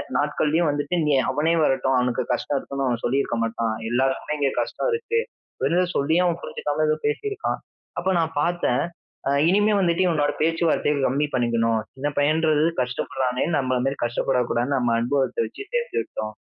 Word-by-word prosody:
நாட்கள்லயும் 155 +2 +1
வந்துட்டு 145 +4 -1
நீ 150 - +1 0.2
அவனே 150 +5 +1
வரட்டும் 135 -2 +2
அவனுக்கு 125 -1 +1
கஷ்டம் 145 - -1
இருக்குன்னு 140 -1 -4
அவன் 120 -2 -1
சொல்லியிருக்க 130 -1 0
மாட்டான்." 115 -1 -1
எல்லாருக்குமே 135 +4 0
இங்கே 140 -1 +2
கஷ்டம் - - -2
இருக்கு. 460 0 0 0.4
வெறும் 180 +1 +1
சொல்லியே 160 +6 +2
அவன் 170 -1 0
புரிஞ்சுக்காம 150 +1 -2
ஏதோ 155 - +3
பேசியிருக்கான். 410 - -2 0.4
அப்போ 185 +2 -1
நான் 160 -1 -1
பாத்தேன் 160 -6 +1 0.4
அ - - +2 0.2
இனிமே 210 +2 +3
வந்துட்டு 170 -1 +2
இவனோட 150 -3 +2
பேச்சுவார்த்தைய 165 -2 +2
கம்மி 140 +4 +1
பண்ணிக்கணும். 115 -2 +1
சின்ன 135 +2 -3
பையன்ன்றது 155 +1 +3 0.2
கஷ்டப்படுறானே 125 0 -1
நம்மள 130 -2 0
மாரி 135 +1 0
கஷ்டப்படக்கூடாதுன்னு 125 +2 0
நம்ம 120 -2 +1
அனுபவத்த 135 - 0
வச்சு 405 - -8
சேர்த்து 485 0 -1
விட்டோம். 110 0 -6
145 Hz, 155 wpm, -23 LUFS, 125-165 Hz, 0.4 s, ஏதோ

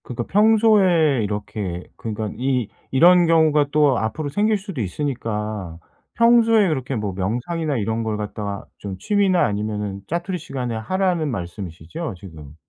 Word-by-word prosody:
그니까 120 -1 -4
평소에 195 - +4
이렇게 100 -3 -4
그니까 110 -1 -4
이 125 -2 0 0.2
이런 175 +5 +6
경우가 155 -3 +4
또 150 -4 +3
앞으로 145 +7 -3
생길 210 +7 +1
수도 190 - -6
있으니까 105 - -3 0.4
평소에 230 -3 +5
그렇게 135 -4 -2
뭐 105 -3 -3
명상이나 125 - -2
이런 110 +1 -1
걸 110 -1 -2
갖다가 105 -1 -5
좀 100 -2 -6
취미나 195 - +2
아니면은 105 -2 -3
자투리 175 +3 -2
시간에 125 -6 -4
하라는 175 +6 0
말씀이시죠? 90 - -6
지금. 80 -6 -12
125 Hz, 335 characters per minute, -22 LUFS, 105-170 Hz, 0.4 s, 이런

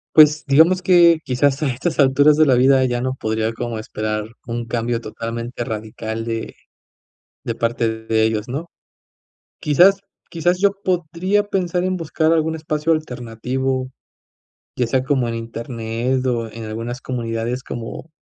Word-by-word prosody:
Pues 155 0 +7
digamos 160 +6 +5
que 175 -3 +5
quizás 135 +3 +1
a - - +2
estas 135 +7 -2
alturas 145 +2 +5
de 155 +1 +5
la 135 -3 +4
vida 130 +1 +5
ya 120 -1 0
no 130 +1 -1
podría 110 -2 -2
como 115 -1 -4
esperar 110 -1 -3 0.2
un 120 0 -4
cambio 115 0 -1
totalmente 115 +2 -5
radical 110 0 -5
de 115 -1 -4 0.9
de 115 - -2
parte 115 0 0 0.2
de 110 0 +1
ellos, 110 -1 0
¿no?, 145 +7 -4 0.9
quizás 180 +7 +5 0.3
quizás 175 +2 +1
yo 200 +1 +4
podría 185 +3 0
pensar 180 -2 -1
en 185 0 -1
buscar 160 -1 0
algún 160 0 +1
espacio 155 0 -2
alternativo, 130 -2 -2 0.9
ya 125 - +1
sea 130 +3 +1
como 135 -3 +1
en 115 0 -3
Internet 115 +2 -3
o 120 -2 0
en 115 0 -7
algunas 115 +3 -5
comunidades 120 0 -3
como, 120 +7 -7
130 Hz, 150 wpm, -20 LUFS, 115-155 Hz, 0.9 s, Pues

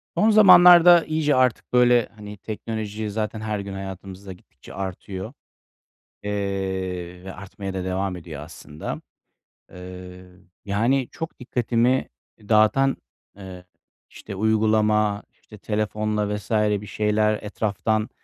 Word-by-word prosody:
Son 220 - +3
zamanlarda 180 -4 +8
iyice 155 -2 +1
artık, 130 -1 +1
böyle, 120 -2 +4
hani, 105 -1 -10
teknoloji 110 0 -5
zaten 110 +1 -3
her 110 -1 -3
gün 100 0 -6
hayatımızda 95 0 -8
gittikçe 90 - -16
artıyor, 95 +3 -6 0.9
eee, 95 -3 -4
ve 95 - -7
artmaya 100 0 -8
da 95 -1 -3
devam 95 0 -2
ediyor 80 -4 -9
aslında. 75 -1 -8 0.7
Eee, 90 0 -10 0.4
yani, 115 +6 +1
çok 160 - -7
dikkatimi 125 0 0 0.4
dağıtan, 115 +5 +3 0.4
eee, 95 -2 -10 0.4
işte, 100 - -10
uygulama, 105 -1 +2
işte, 105 - -17
telefonla 105 0 -2
vs. 105 +1 -9
bir 105 -1 +1
şeyler, 105 +1 +1
etraftan 105 +1 -1
105 Hz, 110 wpm, -23 LUFS, 95-110 Hz, 0.9 s, zamanlarda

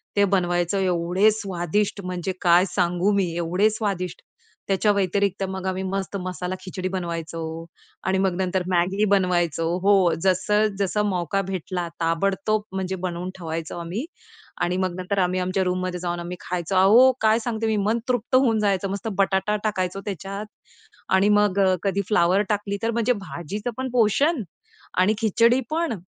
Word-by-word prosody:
त्या 205 -1 +4
बनवायचो. 175 -1 +1
एवढे 185 +3 +2
स्वादिष्ट 200 0 -2
म्हणजे 180 0 -3
काय 175 0 +5
सांगू 180 +2 +2
मी 190 -4 +1
एवढे 180 +5 +2
स्वादिष्ट! 195 -5 -3 0.5
त्याच्या 200 +2 +2
व्यतिरिक्त 200 0 0
मग 190 0 -5
आम्ही 185 0 -2
मस्त 195 +1 -3
मसाला 180 0 -4
खिचडी 185 0 -5
बनवायचो 170 -3 -4 0.7
आणि 190 0 +2
मग 190 -2 +1
नंतर 185 0 0
मॅगी 185 +3 +2
बनवायचो 175 -4 +2 0.2
हो 200 +1 +5 0.3
जसं 210 +3 +2
जसं 200 +2 0
मौका 185 0 -1
भेटला 185 -1 -3
ताबडतोब 195 +5 0
म्हणजे 190 0 -2
बनवून 175 0 -4
ठेवायचो 165 -1 -5
आम्ही. 175 - -4 0.6
आणि 180 +1 0
मग 185 -2 -1
नंतर 195 +2 -1
आम्ही 185 0 +1
आमच्या 185 +1 0
रूममध्ये 180 0 -2
जाऊन 175 -1 -3
आम्ही 175 +1 -6
खायचो. 175 +1 -3
अहो! 220 +8 +7
काय 220 +1 +4
सांगते, 225 -1 -2
मी 220 - +1
मन 220 +3 +1
तृप्त 245 0 0
होऊन 245 -4 +4
जायचं! 195 -2 +1
मस्त 200 +2 -4
बटाटा 195 +2 +2
टाकायचो 195 -2 -1
त्याच्यात 195 +2 -5 0.7
आणि 195 +2 +4
मग 205 -2 +3 0.2
कधी 200 0 +1
फ्लॉवर 185 -1 +3
टाकली 205 -1 -1
तर 230 - +1
म्हणजे 235 +2 +1
भाजीचं 200 +2 -5
पण 260 0 -3
पोषण 250 +5 +2 0.6
आणि 190 +4 +4
खिचडी 230 +3 +3
पण 325 -3 0
190 Hz, 155 wpm, -24 LUFS, 180-210 Hz, 0.7 s, अहो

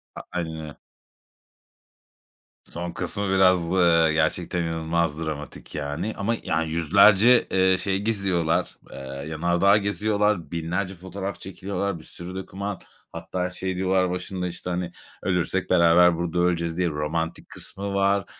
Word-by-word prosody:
A - - -6
aynen 85 -2 -3
öyle. 75 -2 -10 1.9
Son 85 0 -6
kısmı 100 -1 -1
biraz, 95 -2 +4
ııı, 85 -2 +4
gerçekten 85 +2 0
inanılmaz 80 -1 -1
dramatik 75 -1 -7
yani. 75 +8 -3
Ama 110 +3 0
ya 80 +1 0
yüzlerce, 100 +9 +5
eee, 95 0 +4
şey 95 0 -1
geziyorlar. 95 -6 0
Eee, - - -9 0.3
yanardağ 85 +5 +3
geziyorlar. 105 -1 0
Binlerce 90 +3 -2
fotoğraf 95 +1 -6
çekiliyorlar. 95 -1 -4
Bir - - -14
sürü 90 +3 -8
doküman. 95 +1 -5 0.3
Hatta 90 0 -3
şey 95 0 -4
diyorlar 95 0 +1
başında, 90 0 -3
işte, 85 +1 -6
hani 90 -1 -2 0.3
"Ölürsek 90 0 0
beraber 85 0 +5
burada 85 0 -2
öleceğiz." 85 -1 0
diye 90 -1 +1
romantik 80 +2 -3
kısmı 100 0 -5
var. 100 0 +2
90 Hz, 130 wpm, -24 LUFS, 85-95 Hz, 1.9 s, yüzlerce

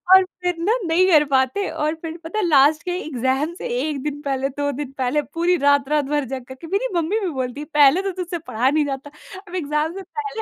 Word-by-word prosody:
और 380 - +7 0.2
फिर 355 -1 0
न 430 +8 +2
नहीं 360 +3 +4
कर 300 -2 +7
पाते 265 +10 +2
और 305 +2 -1
फिर 325 0 -6
पता 385 +7 -3
है 395 - +1
लास्ट 295 0 +4
के 360 - -3
एग्ज़ाम 270 +3 -1
से - - -6
1 290 -2 -2
दिन 290 -1 -4
पहले 275 -1 -1
2 285 +1 -2
दिन 280 0 -5
पहले 265 +3 +1
पूरी 345 +2 +2
रात-रात 285 +1 +3
भर 290 -1 0
जग 260 0 -5
करके 260 +6 -10
मेरी 400 +8 0
मम्मी 345 +6 +1
भी 380 -4 -2
बोलती 260 -1 -4
है - - -6
पहले 295 +5 +6
तो 390 -1 -2
तुझसे 345 0 -4
पाया 245 +4 +1
नहीं 300 0 +2
जाता। 275 +1 -5 0.4
अब 360 - -8
एग्ज़ाम 300 0 -1
से 390 - -6
पहले 435 +3 -5
300 Hz, 230 wpm, -21 LUFS, 275-350 Hz, 0.4 s, और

